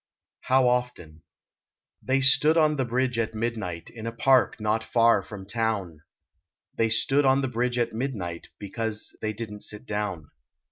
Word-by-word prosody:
HOW 130 0 +4
OFTEN 125 -11 -2 0.8
They 130 +2 +1
stood 135 +4 +5
on 155 -2 +3
the 130 - 0
bridge 125 0 -1
at 110 -1 -2
midnight, 110 -7 -4
In 115 -1 -7
a - - -2
park 130 +1 +3
not 110 +1 0
far 115 0 +3
from 100 -3 -10
town; 100 -7 -2 0.8
They 115 - +1
stood 135 +6 +2
on 135 0 +3
the 135 - -1
bridge 125 0 -1
at 120 -1 0
midnight 110 -9 -4
Because 105 +1 -4
they 110 - -1
didn 105 -1 -7
t - - -2
sit 105 +4 -5
down. 105 - -4
115 Hz, 160 wpm, -26 LUFS, 105-130 Hz, 0.8 s, stood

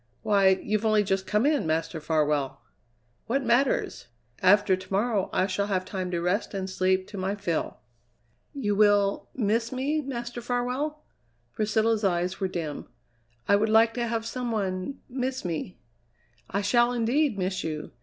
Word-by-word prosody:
Why, 195 -2 +4
you've 215 +1 0
only 215 -1 +3
just 195 -1 -1
come 210 +4 +2
in, 290 - +2
Master 160 0 -1
Farwell!" 150 -4 0 0.7
"What 270 +4 0
matters? 240 - +1 0.3
After 205 0 +5
to 185 +1 -12
morrow 205 0 +1
I 185 - +2
shall 200 +1 -1
have 185 -2 -1
time 185 -2 -4
to 175 -1 -1
rest 180 +5 -1
and 190 -1 -2
sleep 185 0 +1
to 200 - -7
my 190 +2 -1
fill." 175 -6 -2 0.7
"You 230 -8 -1
will 205 -1 +3
miss 230 0 0
me, 280 +4 -1
Master 240 -3 -5
Farwell?" 250 +6 -2 0.5
Priscilla's 220 +1 +1
eyes 180 0 0
were 190 - 0
dim. 165 -5 -5 0.6
"I 200 - +5
would 215 +2 +2
like 225 +1 +5
to 240 0 -2
have 225 -1 -2
some 245 0 -3
one 195 +4 -3
miss 260 -1 -3
me!" 170 +1 -4 0.7
"I 200 - -1
shall, 240 +3 +3
indeed, 245 +1 +1
miss 185 0 -2
you! 155 -1 -4
205 Hz, 160 wpm, -27 LUFS, 185-240 Hz, 0.7 s, After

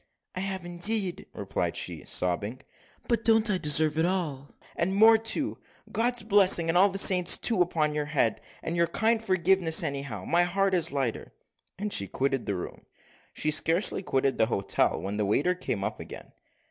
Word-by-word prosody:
"I - - -4
have, 190 -1 -5
indeed," 180 +2 0
replied - - -4
she, - - -4
sobbing; 100 +8 -2 0.5
"but 230 -2 0
don't 225 -1 +3
I 190 - -1
deserve 150 0 +2
it 165 - +2
all, 155 -7 -4 0.3
and 190 +3 -1
more 220 +2 +6
too? 225 +7 -3 0.3
God's 240 0 0
blessing, 195 -5 +4
and 165 - 0
all 190 +3 +5
the 195 - -5
saints' 180 -2 +5
too, 225 -6 0
upon 155 -3 0
your 150 -1 -2
head, 135 -7 0 0.2
for - - -4
your 170 0 +1
kind 225 +3 0
forgiveness, 185 -4 +2
anyhow. 140 0 -5
My 170 +1 +2
heart 190 +2 0
is 175 -6 +1
lighter." 135 -5 -4 0.4
And 205 +2 -4
she 100 - 0
quitted 135 +1 -2
the 100 - -2
room. 90 - -8 0.5
She 155 - -2
had - - +1
scarcely 170 +5 0
quitted 135 -6 -1
the 110 - +3
hotel, 100 -4 -1
when 100 +2 -5
the 105 - -1
waiter 145 - +1
came 135 - -4
up - - -4
again. - - -10
175 Hz, 185 wpm, -27 LUFS, 140-195 Hz, 0.5 s, more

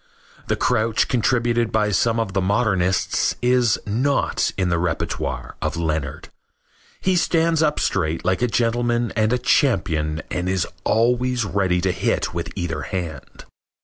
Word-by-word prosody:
The - - +1
crouch 110 0 +1
contributed 120 -1 +1
by 105 -1 +1
some 115 +4 +1
of 105 -4 -2
the 95 - +1
modernists 95 -2 +1
is 125 -2 +3
not 125 +7 0
in 95 -1 +1
the 85 -1 +1
repertoire 85 -2 -3
of - - -2
Leonard. 80 -4 -3 0.7
He 185 0 +2
stands 165 -2 +2
up 150 -1 +1
straight 80 +1 -1
like 95 +3 +1
a 125 - +3
gentleman 120 0 0
and 110 0 +2
a 125 - +3
champion 85 - +1
and 90 +1 -2
is 95 -2 +1 0.2
always 125 +1 +2
ready 95 -2 0
to 95 +1 +1
hit - - -1
with - - -4
either 85 -2 -3
hand. 85 -7 -6
110 Hz, 145 wpm, -22 LUFS, 90-120 Hz, 0.7 s, is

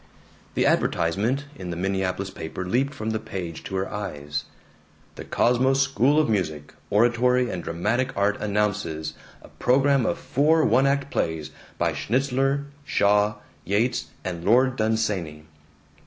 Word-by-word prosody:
The - - +2
advertisement 110 +12 +1
in 90 -6 -7
the 85 - -3
Minneapolis 95 +1 -1
paper 80 +3 -6
leaped 130 +9 +1
from 110 -3 -3
the 110 - -1
page 95 -7 -6
to 95 - -5
her 95 +1 -1
eyes: 75 -8 -4 0.7
The - - -8
Cosmos 130 +3 +2
School 135 +2 +3
of 155 - +3
Music, 80 -9 -2 0.2
Oratory, 120 +3 +3
and 90 -2 -4
Dramatic 110 +10 -1
Art 100 +1 +1
announces 100 -7 -1 0.3
a - - -12
program 135 0 +2
of - - 0
four 155 +4 +2
one 130 +5 +4
act 140 0 0
plays 80 -2 -2 0.3
by - - +1
Schnitzler, 135 +3 0 0.2
Shaw, 105 -4 +2 0.3
Yeats, 105 +6 0 0.2
and 85 -2 -4
Lord 125 +6 +4
Dunsany. 105 -9 -1
105 Hz, 140 wpm, -25 LUFS, 95-130 Hz, 0.7 s, one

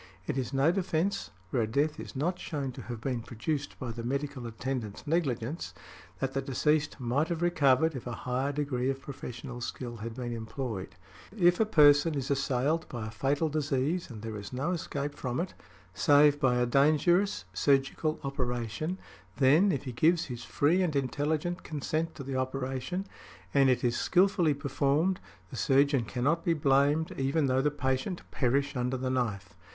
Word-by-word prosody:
It - - -2
is 130 -2 -2
no 140 +4 +3
defence, 185 +1 -1 0.2
where 125 - +1
a 110 - 0
death 145 +7 0
is - - -8
not 175 +7 -1
shewn 140 -4 -3
to - - -9
have 120 -2 -6
been 125 0 -2
produced 135 +6 -4
by 125 -3 -4
the 115 +1 -6
medical 135 0 -3
attendant's 115 -2 -4
negligence, 135 - -1 0.4
that 135 0 -2
the 135 - 0
deceased 150 +3 0
might 130 +5 +1
have 170 0 -2
recovered 160 -2 +3
if 130 - -6
a 120 - -3
higher 130 +3 0
degree 135 -3 -1
of 135 0 -2
professional 125 -3 -7
skill 120 -1 -5
had 115 +1 -6
been 120 -2 -4
employed. 110 -5 -5 0.4
If 175 -2 +4
a 220 - +3
person 150 -4 +6
is 140 0 -2
assailed 140 +3 0
by 120 -3 -5
a 110 - -6
fatal 140 +8 0
disease, 150 +2 -1
and 110 -4 -9
there 110 -1 -4
is 100 -1 -8
no 135 +7 -1
escape 145 -4 -3
from 125 -3 -3
it, 180 +2 -3 0.4
save 145 - +5
by 130 -3 +3
a 125 0 +2
dangerous 150 - +3
surgical 140 - +1
operation, 130 - -2 0.4
then, 150 +9 +5
if 140 - -2
he 130 - -5
gives 160 +8 +3
his 120 -3 -7
free 160 +10 +2
and 170 -5 0
intelligent 150 +5 -1
consent 155 +2 -3
to 140 - -7
the 135 0 -4
operation, 130 +7 -2 0.5
and 135 -1 +5
it 125 -1 +2
is 120 -1 +1
skilfully 180 -4 +3
performed, 145 +6 +1 0.3
the - - -7
surgeon 140 -3 +3
cannot 140 +9 0
be 170 - +2
blamed 145 +2 +3
even 140 +3 +1
though 130 0 +2
the 150 - +2
patient 130 +5 -2
perish 140 +2 +1
under 125 +1 -1
the 130 0 -2
knife. 105 -8 -2
135 Hz, 175 wpm, -30 LUFS, 125-155 Hz, 0.5 s, person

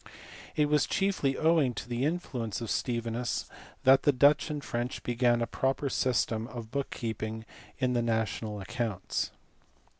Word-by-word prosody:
It 150 - +4
was 150 0 +3
chiefly 190 -9 +1
owing 155 -6 +3
to - - -5
the 120 +2 -1
influence 130 - -2
of 115 -2 -4
Stevinus 115 +3 -1 0.4
that 135 +1 +7
the 145 - +4
Dutch 145 +3 +4
and 150 -2 -3
French 120 +1 -3
began 120 -1 +2
a - - +1
proper 135 +3 -1
system 115 -4 0
of 115 -3 -8
book 140 -1 -2
keeping 110 -1 -4 0.3
in 125 -1 +1
the 120 - +2
national 110 -2 -1
accounts. 115 -2 -2
120 Hz, 150 wpm, -30 LUFS, 115-140 Hz, 0.4 s, that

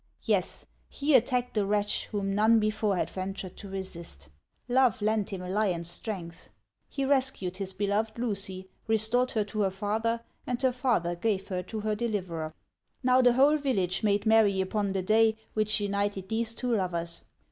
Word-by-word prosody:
Yes, - - 0 0.2
he 290 +1 0
attacked 250 0 +3
the 210 - +1
wretch, 205 +1 0
whom 200 -2 -2
none 220 +3 +5
before 215 -1 +1
had - - 0
ventured 190 -1 -5
to 200 - -8
resist. 170 - -5 0.4
Love 250 -4 +3
lent 215 -1 0
him 190 -2 -5
a 180 - -6
lion's 180 -5 0
strength. 175 -6 -6 0.4
He 275 - -2
rescued 265 -10 +1
his 195 -1 -3
beloved 205 +3 -1
Lucy, 195 -5 -3 0.2
restored 225 +3 +2
her 215 - +2
to 210 +1 -3
her 195 - +3
father, 220 +4 -1 0.3
and 245 -1 -1
her 260 - +4
father 240 -9 0
gave 195 +1 -1
her 180 -2 -1
to 215 +4 -6
her 215 0 0
deliverer. 185 -8 -3 0.5
Now, 255 0 +5
the 245 -1 +5
whole 280 +4 +5
village 195 - 0
made 205 -1 +1
merry 220 -3 +4
upon 200 +2 0
the 190 -1 -1
day 220 +2 +4 0.2
which 215 0 +1
united 200 -1 -1
these 230 0 -1
two 245 -2 0
lovers. 170 -4 -2
210 Hz, 170 wpm, -29 LUFS, 190-230 Hz, 0.5 s, none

